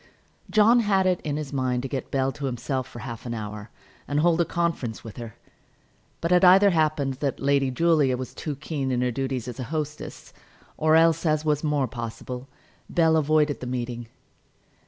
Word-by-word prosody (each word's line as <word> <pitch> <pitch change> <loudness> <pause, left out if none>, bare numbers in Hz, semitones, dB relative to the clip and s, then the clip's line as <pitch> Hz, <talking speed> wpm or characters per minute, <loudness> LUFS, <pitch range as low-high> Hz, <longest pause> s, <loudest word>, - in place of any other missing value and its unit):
John 220 +3 +5
had 200 -4 +2
it 185 -2 +1
in 145 -1 -3
his 150 -2 -5
mind 130 -2 0
to - - -2
get 135 0 -4
Bell 135 0 0
to 145 0 -6
himself 130 0 -2
for 120 - -12
half 120 -1 -7
an 120 - -3
hour, 105 -1 -6 0.4
and 145 +1 0
hold 170 +1 +3
a - - +2
conference 165 -11 -2
with 115 - -10
her; 115 -3 -8 0.9
but 170 - -1
it 180 0 +5
either 195 +2 +7
happened 155 -4 +1
that 140 -2 -2
Lady 140 -1 +2
Julia 145 -2 +2
was 130 0 -6
too 150 -2 -5
keen 140 -2 -3
in 125 -1 0
her 125 0 +1
duties 130 -1 -3
as 125 -1 -7
a 125 - -3
hostess, 150 +1 -5 0.4
or 155 0 +3
else, 165 0 +4
as 155 -2 +1
was 150 -1 +1
more 145 -3 +1
possible, 120 +2 -6 0.4
Bell 160 -2 +3
avoided 150 -3 +2
the 125 - -6
meeting. 120 -1 -4
140 Hz, 190 wpm, -25 LUFS, 125-160 Hz, 0.9 s, either